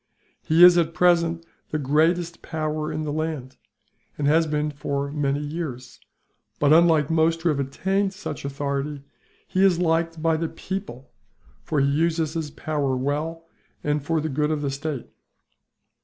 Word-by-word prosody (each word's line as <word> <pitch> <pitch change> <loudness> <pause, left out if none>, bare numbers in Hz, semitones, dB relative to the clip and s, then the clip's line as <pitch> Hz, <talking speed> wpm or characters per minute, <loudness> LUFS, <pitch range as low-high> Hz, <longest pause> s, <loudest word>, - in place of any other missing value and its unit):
He 165 +3 +4
is, 175 -1 +9
at 165 -1 -1
present, 170 -1 +2 0.2
the 155 - -1
greatest 160 +5 +1
power 155 -1 -3
in 155 0 -3
the 150 -1 -3
land, 155 -5 -4 0.6
and 145 - -2
has 160 +3 +4
been 150 0 -1
so 145 - -21
for 140 0 -2
many 145 -1 0
years 145 -5 -6 0.6
but, 145 +1 +4
unlike 160 -3 +4
most 165 0 +2
who 175 - +3
have 145 -3 0
attained 190 +9 0
such 190 - -7
authority, 140 0 -3 0.4
he 185 - +1
is 190 -3 +5
liked 165 -1 0
by 160 0 +2
the 165 0 -2
people, 165 - -6 0.5
for 145 - -1
he 140 - +3
uses 160 +2 +1
his 160 -3 -3
power 140 -3 -2
well, 155 +5 -2 0.4
and 150 -1 0
for 160 +2 0
the 155 - -2
good 150 +2 0
of 155 -2 -1
the 140 - -1
state. 140 -1 -4
155 Hz, 165 wpm, -24 LUFS, 145-165 Hz, 0.6 s, is